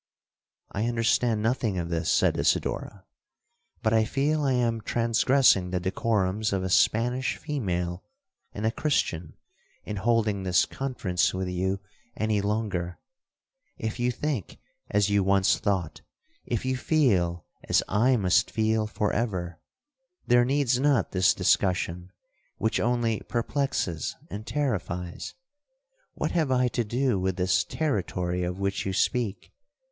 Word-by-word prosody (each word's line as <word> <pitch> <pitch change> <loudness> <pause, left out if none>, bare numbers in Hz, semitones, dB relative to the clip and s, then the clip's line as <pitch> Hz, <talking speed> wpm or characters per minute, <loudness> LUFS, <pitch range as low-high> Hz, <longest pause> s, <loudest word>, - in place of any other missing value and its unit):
'—'I 105 +4 -1
understand 115 -1 +1
nothing 115 -4 0
of 85 -1 -3
this,' 80 -1 -1
said - - +3
Isidora; 95 -2 -1 0.8
'but 110 - +2
I 110 0 +4
feel 145 +6 0
I 135 -2 +2
am 115 -2 0
transgressing 115 -3 +3
the 90 0 -1
decorums 100 +2 0
of 95 -2 -1
a 95 - -2
Spanish 125 +6 +2
female 90 - -3 0.5
and 105 - -4
a 110 - +2
Christian, 90 - -1 0.5
in 105 - -5
holding 110 -2 +1
this 90 -4 +3
conference 95 -11 -1
with 95 0 -2
you 95 +2 -1 0.4
any 110 -1 +1
longer. 100 -4 -2 0.8
If 110 +2 -4
you 120 +1 +1
think 135 - -3 0.3
as 105 0 +2
you 100 -1 +3
once 95 0 +3
thought,—if 100 - -4
you 130 0 0
feel 95 - +1 0.2
as - - +4
I 125 +5 +3
must 100 +2 +2
feel 110 0 +1
for 105 -1 -1
ever,—there 120 - -2
needs 135 -2 +1
not 140 -2 +2
this 90 -1 +3
discussion, 90 -1 +1 0.5
which 110 - 0
only 115 -2 +1
perplexes 120 - -1 0.2
and 105 +2 -6
terrifies. 90 -11 -3 0.8
What - - -2
have 160 -5 +1
I 125 -1 +2
to 120 - -1
do 120 -1 0
with 95 0 -1
this 90 +1 +2
territory 90 - -2
of 90 +1 -2
which 100 0 -1
you 95 - -2
speak? 115 0 -1
110 Hz, 130 wpm, -27 LUFS, 95-125 Hz, 0.8 s, I